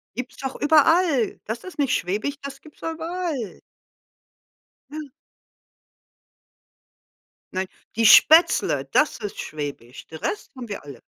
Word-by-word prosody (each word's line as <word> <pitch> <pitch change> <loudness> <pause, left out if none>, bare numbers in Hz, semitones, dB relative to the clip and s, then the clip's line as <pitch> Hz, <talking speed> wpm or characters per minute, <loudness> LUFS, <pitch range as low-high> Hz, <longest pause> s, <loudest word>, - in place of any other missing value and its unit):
Gibt's 250 +2 -6
doch 265 -1 -5
überall. 310 - +3
Das 225 +2 -5
ist 370 - -10
nicht 275 -3 +2
schwäbisch, 210 +10 -2
das 275 -1 -8
gibt's 310 - -17
doch 325 - -3
überall. 320 - -4 1.3
Ja. 305 -1 -7 2.4
Nein, 185 0 -2 0.3
„die 230 - +2
Spätzle“, 315 +9 +6
das 300 - +2
ist 205 -3 -6
schwäbisch. 145 -5 -7
Den 160 - -10
Rest 420 - -4
haben 250 -2 -8
wir 200 - -6
alle. 140 -5 -11
265 Hz, 125 wpm, -23 LUFS, 205-315 Hz, 2.4 s, Spätzle